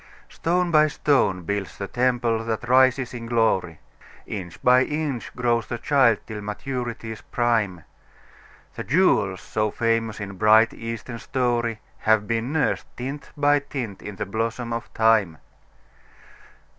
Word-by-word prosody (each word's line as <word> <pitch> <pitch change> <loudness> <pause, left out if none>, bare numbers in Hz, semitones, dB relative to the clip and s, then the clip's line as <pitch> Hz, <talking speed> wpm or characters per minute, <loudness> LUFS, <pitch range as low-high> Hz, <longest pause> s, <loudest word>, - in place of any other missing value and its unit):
Stone 175 +1 0
by 155 -1 +5
stone 135 - +1
builds 100 +2 -3
the 100 - -4
temple 120 -1 0
that 115 +1 -3
rises 130 0 +3
in 115 -1 -6
glory, 110 -8 +1 0.5
Inch 90 -5 -7
by 125 +1 +6
inch 150 -5 -3
grows 120 -2 0
the 120 - -3
child 130 -4 +3
till 105 -2 -6
maturity's 115 0 -5
prime; 110 -8 0 0.9
The - - -6
jewels 110 - +2
so 110 0 -1
famous 115 0 -1
in 100 -2 -6
bright, 110 +3 +5
Eastern 115 +1 -6
story 120 -3 -1 0.2
Have 110 -1 +3
been 115 +3 -1
nursed, 155 -2 0
tint 135 +3 -6
by 145 0 +4
tint, 130 -8 -6
in 105 - -7
the - - -3
blossom 115 +3 -3
of 115 0 -5
Time. 110 -7 +3
115 Hz, 135 wpm, -24 LUFS, 110-130 Hz, 0.9 s, by